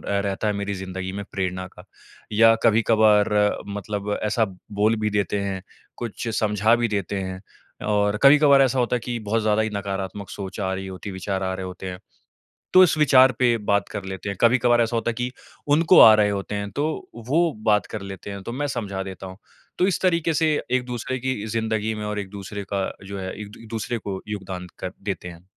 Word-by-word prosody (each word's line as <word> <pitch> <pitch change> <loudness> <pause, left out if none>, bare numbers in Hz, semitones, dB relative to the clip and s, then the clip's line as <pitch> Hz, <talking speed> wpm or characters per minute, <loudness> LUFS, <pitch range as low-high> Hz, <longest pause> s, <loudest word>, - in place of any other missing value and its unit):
रहता 100 +1 -1
है 105 - +2
मेरी 100 0 -3
ज़िन्दगी 95 0 -5
में 100 0 -5
प्रेरणा 95 -1 -2
का। - - -15 0.5
या 115 +1 +6
कभी-कभार 110 -2 +4 0.4
मतलब 105 0 -3
ऐसा 110 +1 +2 0.3
बोल 105 +2 +2
भी 105 0 0
देते 100 0 0
हैं, 95 -2 -3 0.3
कुछ 120 0 -5
समझा 105 +1 +3
भी 120 0 0
देते 100 -2 -2
हैं। 95 0 -5 0.5
और 105 0 +2
कभी-कभार 140 -1 +7
ऐसा 130 0 +1
होता 125 0 +1
है - - -3
कि 120 -1 -3
बहुत 110 +1 -1
ज़्यादा 110 0 +2
ही 110 - -2
नकारात्मक 100 0 -4
सोच 95 +1 -6
आ 95 -1 -1
रही 95 0 -5
होती 95 +2 -8
है, - - -5
विचार 95 +1 -3
आ 95 - -1
रहे 95 0 -5
होते 95 +1 -8
हैं 90 - -7 0.8
तो 185 0 +9
इस 160 - +3
विचार 130 -3 +6
पे 120 -2 +3
बात 100 -1 0
कर 100 -2 -6
लेते 95 +1 -5
हैं। 100 - -4
कभी-कभार 120 0 +4
ऐसा 115 +1 0
होता 115 +1 0
है - - -6
कि 125 +2 -3 0.4
उनको 165 +3 +6
आ 110 - +10
रहे 105 -1 +3
होते 100 +1 -3
हैं 100 0 -3
तो 145 - 0 0.4
वो 165 +3 +3
बात 105 -1 +3
कर 110 - -4
लेते 100 +1 -8
हैं, 100 - -7
तो - - -5
मैं 145 +4 -2
समझा 100 -7 -3
देता 95 0 -8
हूँ। 95 +1 -10 0.4
तो 180 - +4
इस 190 - 0
तरीके 170 -3 +2
से 155 0 +2 0.2
एक 130 -1 +2
दूसरे 125 +1 -3
की 130 -4 -2
ज़िन्दगी 110 -1 -1
में 105 - -5
और 105 0 -3
एक-दूसरे 100 +1 -6
का 95 -1 0 0.2
जो 100 -1 -6
है 95 0 -4
एक 105 - -8
दू 115 +1 -13
दूसरे 115 +1 -3
को 100 -3 -5
योगदान 95 -3 -5
कर 90 - -4
देते 100 -3 -4
हैं। 85 0 -13
105 Hz, 215 wpm, -23 LUFS, 95-115 Hz, 0.8 s, आ